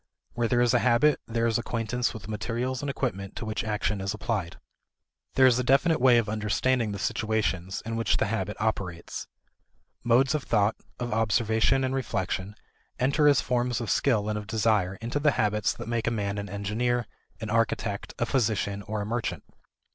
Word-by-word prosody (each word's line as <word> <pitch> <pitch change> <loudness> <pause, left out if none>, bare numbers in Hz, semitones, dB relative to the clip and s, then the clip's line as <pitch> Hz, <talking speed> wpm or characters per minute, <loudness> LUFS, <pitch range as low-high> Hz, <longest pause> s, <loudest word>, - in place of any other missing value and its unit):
Where 120 -1 0
there 120 0 +2
is 120 0 +3
a 120 - +4
habit, 125 +5 +3
there 115 0 0
is 115 0 +2
acquaintance 120 +1 -1
with 110 -4 -9
the - - -10
materials 120 +4 -2
and 145 - -3
equipment 100 -8 -3
to - - -5
which 110 0 -2
action 105 -2 -1
is 100 +2 -2
applied. 105 -5 -3 0.8
There 130 - +6
is 125 -1 +5
a - - +1
definite 135 +4 +3
way 125 -2 +6
of 115 -2 +1
understanding 110 +2 0
the 100 - -4
situations 95 -3 -1
in 115 0 -3
which 115 -2 +1
the - - +1
habit 105 -1 -2
operates. 95 -6 -3 0.8
Modes 125 +3 +4
of 150 - 0
thought, 105 -4 +2 0.2
of 120 -2 -3
observation 110 +3 +2
and 130 0 0
reflection, 100 -6 -2 0.4
enter 140 +4 +3
as 145 -3 +5
forms 125 -1 0
of 115 - -2
skill 110 -7 +2
and 105 0 -1
of 105 - -9
desire 105 -3 +1
into 120 +5 -2
the 145 -1 +3
habits 105 -1 +1
that - - -8
make 115 0 -1
a - - +5
man 100 -3 -2
an 100 -1 -5
engineer, 110 +5 -1 0.3
an 110 0 -5
architect, 115 -2 -1
a 120 - 0
physician, 105 -6 0
or 105 +2 -4
a - - -3
merchant. 115 +2 -3
115 Hz, 190 wpm, -27 LUFS, 105-125 Hz, 0.8 s, There